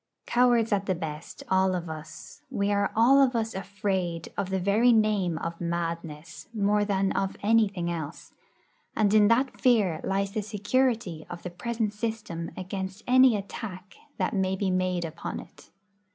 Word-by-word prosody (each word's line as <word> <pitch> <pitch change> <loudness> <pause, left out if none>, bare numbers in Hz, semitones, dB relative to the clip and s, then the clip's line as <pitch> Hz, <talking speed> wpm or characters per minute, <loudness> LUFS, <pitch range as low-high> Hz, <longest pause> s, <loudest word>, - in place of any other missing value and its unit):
Cowards 240 -2 +3
at 200 -1 0
the 185 - +1
best, 160 -2 -7
all 190 0 +2
of 175 -1 -4
us, 155 0 -9
we 200 0 0
are 200 0 +1
all 255 +5 +6
of 260 -2 +3
us 225 -1 -1
afraid 190 -3 -3
of 190 - -2
the 190 0 0
very 210 +6 +4
name 210 -7 +2
of 165 +2 -5
'madness' 170 -2 -4
more 205 0 +2
than 195 -1 +1
of 195 0 -1
anything 200 -5 +2
else; 160 -1 -6 0.6
and 210 -2 +2
in 210 -1 +6
that 255 +4 +1
fear 210 -10 +3
lies 195 0 -1
the 215 +1 -2
security 210 -4 -1
of 175 0 -8
the 180 - -5
present 225 +2 -2
system 210 -7 -4
against 190 +1 -5
any 255 -1 +6
attack 195 -1 -7 0.2
that - - -1
may 190 -2 +1
be 190 0 -1
made 185 -1 0
upon 165 +1 -5
it. - - -15
195 Hz, 165 wpm, -27 LUFS, 175-220 Hz, 0.6 s, all